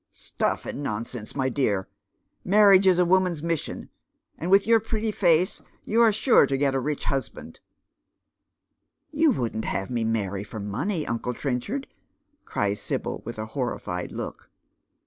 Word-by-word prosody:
" - - -56
StuS - - -2
and - - -5
nonsense, 115 -2 -5
my 130 -2 0
dear 120 -7 +1
I - - -49
Marriage 195 -1 +6
is 185 -2 +5
a 180 - +4
woman's 180 -3 +2
mission, 165 -2 -3 0.4
and 170 - -4
with 195 +1 +5
your 230 0 +5
pretty 220 0 -2
face 175 -3 +2 0.2
you 230 +2 +2
are 230 -2 +6
sure 220 - +4
to 135 - 0
get 135 0 +1
a 135 - +1
rich 145 +2 -3
husband." 135 -2 -4 0.8
" - - -57 0.7
You 315 +1 +3
wouldn't 115 - -1
have 95 +4 -3
me 120 -2 0
marry 100 -3 -1
for 110 +1 -8
money, 145 - -2
uncle 120 +1 -3
Trenchard 145 - -3
I - - -40 0.3
" 290 - -45
cries 100 0 -1
Sibyl, - - -3
with 120 +1 -6
a 110 - -4
horrified 120 -9 -3
look. - - -7
145 Hz, 170 wpm, -25 LUFS, -, 0.8 s, Marriage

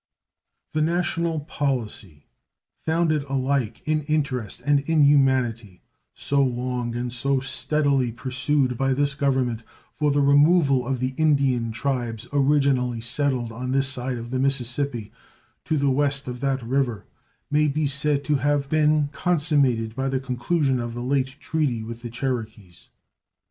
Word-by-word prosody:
The 155 - 0
national 170 -1 0
policy, 120 - -3 0.6
founded 160 -2 +2
alike 135 -4 -1
in 155 0 +1
interest 140 -8 -1
and 145 -1 +4
in 160 -2 +4
humanity, 130 -8 +2 0.3
so 140 0 +1
long 125 -1 -2
and 120 0 -3
so 135 +2 0
steadily 135 -1 0
pursued 130 +1 -1
by 135 -1 +1
this 145 0 +1
Government 130 -5 0 0.3
for 150 -1 0
the 145 0 +2
removal 140 -2 +4
of 130 -2 -2
the 130 +1 -1
Indian 135 -7 +2
tribes 120 -2 -3
originally 135 -4 +2
settled 125 -1 -1
on 125 +3 -4
this 135 0 +2
side 130 -1 -2
of 120 +1 -7
the 130 - -1
Mississippi 130 -3 -1 0.5
to 160 - 0
the 140 - 0
W 140 +1 +2 0.2
of 125 -1 -6
that 135 -1 -1
river, 120 -3 -1 0.5
may 150 +1 +3
be 150 +1 0
said 140 +1 0
to 150 0 +1
have 140 0 0
been 150 -1 +2
consummated 145 -10 +1
by 135 +1 -1
the 135 0 0
conclusion 130 +2 0
of 120 -1 -4
the 120 - -4
late 135 0 0
treaty 145 -9 -1
with 115 +1 -8
the 120 - -6
Cherokees. 110 -7 -5
135 Hz, 145 wpm, -24 LUFS, 120-145 Hz, 0.6 s, and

